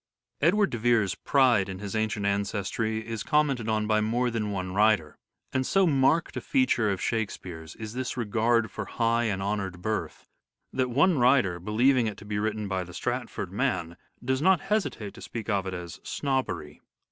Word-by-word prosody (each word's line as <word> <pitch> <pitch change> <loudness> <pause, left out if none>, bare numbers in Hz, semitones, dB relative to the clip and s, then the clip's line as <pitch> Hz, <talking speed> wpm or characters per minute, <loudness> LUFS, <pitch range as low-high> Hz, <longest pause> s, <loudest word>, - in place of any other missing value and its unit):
Edward 195 +7 +3
de 120 - -3
Vere's 110 -5 +3
pride 120 -4 +3
in 95 - -5
his 100 +2 -6
ancient 110 -1 -1
ancestry 100 +2 -1
is 115 -2 -4
birth. - - -9
commented 140 -7 +2
on 110 -1 +1
by 110 0 +2
more 120 +3 +1
than 110 -2 -2
one 95 -2 -3
writer; 100 -7 +2 0.3
and 130 - +1
so 195 +8 +3
marked 150 +1 +2
a - - -3
feature 255 - +2
of 95 -2 -1
Shakespeare's 90 -7 -4
is 110 -1 -7
this 130 +1 -3
regard 115 -1 +1
for - - -5
high 115 0 +1
and 95 -3 -1
honoured 95 -3 -3
birth, 110 +1 -3 0.5
that 130 -1 0
one 145 +5 +3
writer, 120 -8 +3
believing 115 +6 +2
it 105 -2 -4
to 105 - -12
be 105 0 -2
written 110 0 -2
by 95 -2 -1
the 90 0 -11
Stratford - - -3
man, 85 0 -1 0.3
does 130 +1 0
not 185 -1 +4
hesitate 195 - -2
to - - -12
speak 115 -2 -6
of 100 -2 0
it 95 - -3
as 85 -2 -7
" - - -41
snobbery." 110 - -2
110 Hz, 190 wpm, -27 LUFS, 100-125 Hz, 0.5 s, not